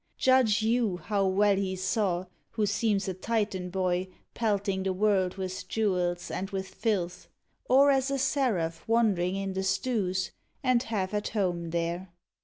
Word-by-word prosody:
Judge 250 -4 +4
you 225 -4 +1
How 200 +1 0
well 200 +2 +3
he 190 -1 -1
saw, 185 -1 0 0.3
who 220 -2 +1
seems 205 -1 0
a 190 - -1
Titan 190 -2 -2
boy 185 0 0 0.3
Pelting 200 -3 0
the 190 0 0
world 190 -2 +2
with 185 -1 -5
jewels 180 -5 0
and 195 - -3
with 190 -2 -4
filth, 185 -3 -2 0.4
Or 275 +2 +6
as 270 0 +2
a 275 - 0
seraph 235 - 0
wandering 205 -6 +2
in 195 -1 -3
the 190 - -1
stews, 190 -2 0 0.3
And 255 -2 +3
half 205 -4 -2
at 210 0 -1
home 175 -5 -1
there. 170 +2 -2
195 Hz, 155 wpm, -28 LUFS, 185-220 Hz, 0.4 s, Or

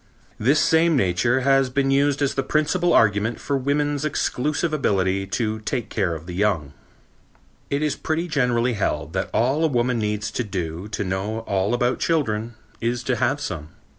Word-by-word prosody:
This 135 +7 +3
same 160 0 +4
Nature 120 +6 +2
has 135 0 +3
been 135 +1 +1
used 140 +1 +2
as 140 - +1
the 135 - 0
principal 165 +5 +1
argument 105 +1 +3
for 140 - -2
woman's 145 +2 0
exclusive 150 +2 -1
ability 95 -8 +1
to 110 +2 -2
take 120 +2 -3
care 95 -6 0
of 80 +1 -9
the 90 - -7
young. 90 -7 0 1.0
It 140 +2 0
is 150 -2 0
pretty 160 +2 -2
generally 125 -5 +1
held 80 -6 -2
that 95 - -2
all 135 +7 +1
a - - +5
woman 125 -3 0
needs 105 -1 -2
to 125 - -2
do 90 -3 -4
to 105 - -3
know 100 +4 -2
all 100 +1 0
about 120 +1 0
children 115 -8 0 0.3
is 120 +1 -1
to 125 0 0
have 130 +4 +1
some. 80 - -5
120 Hz, 175 wpm, -23 LUFS, 100-140 Hz, 1.0 s, a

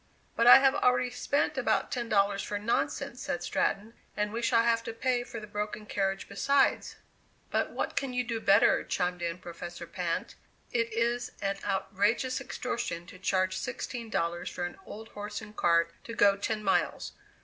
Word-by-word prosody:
"But 230 - +3
I - - +12
have 270 0 +4
already 250 -3 +2
spent 285 +3 0
about - - +1
ten 240 -2 -3
dollars 200 -1 +2
for 205 - -3
nonsense," 210 +3 -1
said - - -3
Stratton, 215 +3 -1 0.2
"and 210 0 -1
we 235 - -2
shall 230 -1 +3
have 230 -1 +2
to 230 - -4
pay 245 +1 0
for 230 - -7
the 215 - -8
broken 210 +1 -4
carriage 195 -2 -1
besides." 275 +7 +2 0.6
"But - - +1
what - - -3
can 270 -2 -1
you 250 0 0
do 230 -2 -3
better?" 200 -2 +4
chimed 180 0 -1
in 170 0 -2
Professor 175 -1 -8
Pinte. 170 0 -3 0.4
"It 230 -1 0
is 235 +2 -1
an 195 -1 -1
outrageous 205 +6 0
extortion 235 -9 -4
to 185 +1 -13
charge 185 -1 +1
sixteen 240 +1 -5
dollars 170 -3 -1
for 175 - -3
an 175 - -7
old 220 +1 -9
horse 210 0 -6
and 210 0 -11
cart 170 -2 +3
to 230 - -6
go 200 -2 +5
ten 215 +2 -3
miles. 195 - 0
210 Hz, 180 wpm, -29 LUFS, 195-235 Hz, 0.6 s, I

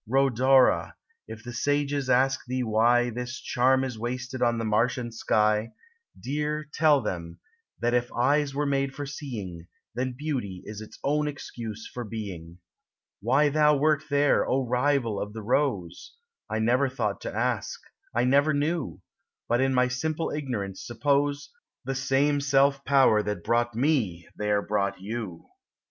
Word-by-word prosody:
Rhodora! 130 +1 +3 0.3
if 110 0 -9
the 120 0 -7
sages 145 +1 0
ask 130 +1 +3
thee 130 0 -1
why 120 +2 +3
This 125 +4 -5
charm 130 +1 +2
is 125 -4 -4
wasted 125 +2 -4
on 120 -1 +2
the 115 - -2
marsh 110 +4 +2
and 120 -2 -5
sky, 105 0 +1 0.5
Dear, 150 +3 -2
tell 155 -3 +4
them, 85 -2 -5 0.4
that 120 0 0
if 120 0 +1
eyes 140 +3 +1
were 145 +1 0
made 135 -1 0
for 145 - -4
seeing, 105 - -7 0.3
Then 125 +2 -2
beauty 125 -11 -4
is 105 0 -7
its 110 - -11
own 150 +1 +1
excuse 115 -6 -7
for 120 - -4
being. 95 -7 -7 0.6
Why 135 +7 +3
thou 150 0 +4
wert 155 +1 +2
there, 145 0 +3
O 130 0 +1
rival 125 -3 +1
of 105 0 -5
the 110 -1 -7
rose! 115 - -1 0.3
I 110 - -1
never 125 +5 +2
thought 110 -6 -2
to - - -4
ask; 120 -2 -1 0.4
I 120 - +3
never 140 +4 +3
knew, 145 - -2 0.5
But 120 +2 +2
in 135 0 +2
my 125 -1 +3
simple 155 +6 -2
ignorance 115 -10 -4
suppose 145 +3 0 0.3
The 135 - -2
self 140 +2 +1
same 140 0 +3
Power 135 -6 +5
that 105 -4 -4
brought 120 +1 +1
me 115 - 0
there 105 -1 0
brought 100 -2 -1
you. 100 -3 -6
125 Hz, 155 wpm, -27 LUFS, 110-140 Hz, 0.6 s, Power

